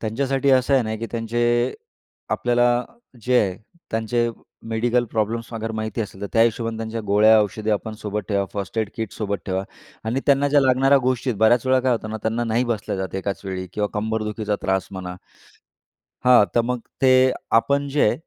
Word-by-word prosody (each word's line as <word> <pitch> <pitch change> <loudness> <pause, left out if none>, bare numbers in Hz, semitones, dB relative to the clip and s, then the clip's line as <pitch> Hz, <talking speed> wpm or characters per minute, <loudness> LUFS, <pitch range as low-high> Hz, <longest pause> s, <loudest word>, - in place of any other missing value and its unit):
त्यांच्यासाठी 135 +5 0
असं 130 +1 +4
आहे 130 - +4
ना, 110 0 -3
की 115 +1 -5
त्यांचे 120 +1 0 0.6
आपल्याला 120 0 +2 0.4
जे 125 +1 +3
आहे 95 -2 -1 0.3
त्यांचे 115 +1 0 0.4
मेडिकल 120 +2 +1
प्रॉब्लेम्सअगर 115 0 -2
माहिती 110 0 -3
असेल 100 -2 -6
तर 100 - -3
त्या 115 - +5
हिशोबाने 115 -1 0
त्यांच्या 115 0 -4
गोळ्या-औषधे 110 +1 +3
आपण 110 +1 -2
सोबत 105 -1 -4
ठेवा. 100 -1 +1
फर्स्ट 100 +2 -4
एड 110 - 0
किट 110 -3 -4
सोबत 100 -2 -3
ठेवा 95 0 -1 0.4
आणि 120 +5 -1
त्यांना 140 0 +4
ज्या 145 0 +4
लागणाऱ्या 135 +1 +4
गोष्टी 125 0 0
बऱ्याच 110 +4 +3
वेळा 130 0 +4
काय 125 0 +2
होतं 110 -2 -3
ना, 110 - -3
त्यांना 115 +2 -1
नाही 115 +2 +1
बसल्या 110 -4 -2
जात 95 -2 -4
एकाच 95 +1 -3
वेळी 95 -1 -4
किंवा 105 +1 -1
कंबरदुखीचा 105 0 -2
त्रास 95 0 0
म्हणा 90 -2 -6 1.1
हां 125 -5 +7
तर 120 - +5
मग 125 +1 -2 0.2
ते, 130 0 +5 0.2
आपण 140 +5 +2
जे 145 +1 +1
आहे 120 - +1
115 Hz, 175 wpm, -22 LUFS, 105-125 Hz, 1.1 s, हां